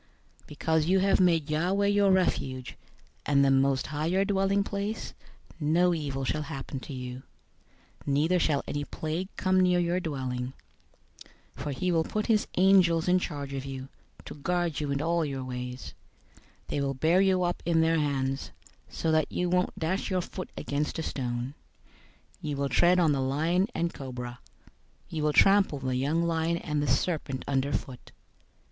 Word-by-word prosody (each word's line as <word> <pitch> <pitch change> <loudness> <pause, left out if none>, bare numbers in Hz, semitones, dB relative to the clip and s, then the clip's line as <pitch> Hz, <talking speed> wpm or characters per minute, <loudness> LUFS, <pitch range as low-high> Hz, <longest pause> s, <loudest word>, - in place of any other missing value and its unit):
091:009 - - -22
Because 160 +1 0
you 190 +2 +4
have 195 +1 +3
made 165 -5 +3
Yahweh 180 +6 +1
your 205 0 +3
refuge, 130 -9 0 0.5
and 140 -1 +3
the 135 - +4
Most 135 0 +2
High 155 +1 -2
your 190 +3 +2
dwelling 195 0 +2
place, 205 +2 -4 0.5
091:010 145 - -1
no 175 +3 +4
evil 140 -4 -3
shall 150 +4 -1
happen 135 -1 -6
to 135 - -10
you, 125 0 -6 0.9
neither 155 +6 +2
shall 150 -4 +1
any 145 0 -2
plague 160 +5 -4
come 185 -1 +2
near 180 -1 +4
your 175 +1 +1
dwelling. 130 -6 -3 1.0
091:011 130 - -7
For 145 - -2
he 180 +6 -1
will 165 -1 +2
give 215 +5 -2
his 220 -3 +2
angels 180 -3 +5
charge 145 -5 -5
over 135 0 -4
you, 135 0 -6 0.4
to - - -7
guard 175 +1 -1
you 150 -2 -2
in 140 +1 -1
all 170 0 +1
your 135 -3 -3
ways. 125 0 -6 0.7
091:012 - - -41
They 145 - -1
will 135 -1 0
bear 165 +7 +3
you 190 -2 +3
up 175 0 -1
in 165 -1 +2
their 165 0 +3
hands, 135 -2 -1 0.4
so 160 - -1
that 155 0 +2
you 180 -1 -1
won't 180 0 +1
dash 170 +4 -1
your 185 -2 +1
foot 185 +1 -7
against 145 +3 -2
a 160 - -2
stone. 125 -2 -3 0.9
091:013 155 - -3
You 145 - -2
will 140 0 -1
tread 175 +8 +4
on 165 -4 +4
the 140 -2 +1
lion 160 +8 +1
and 170 0 -1
cobra. 125 -2 -7 0.7
You 160 - -3
will 150 0 +1
trample 195 -5 +5
the 130 -1 -2
young 145 +6 +1
lion 165 0 0
and 150 -3 -2
the 145 - -1
serpent 135 0 -1
underfoot. 135 -2 -2
155 Hz, 180 wpm, -28 LUFS, 135-180 Hz, 1.0 s, angels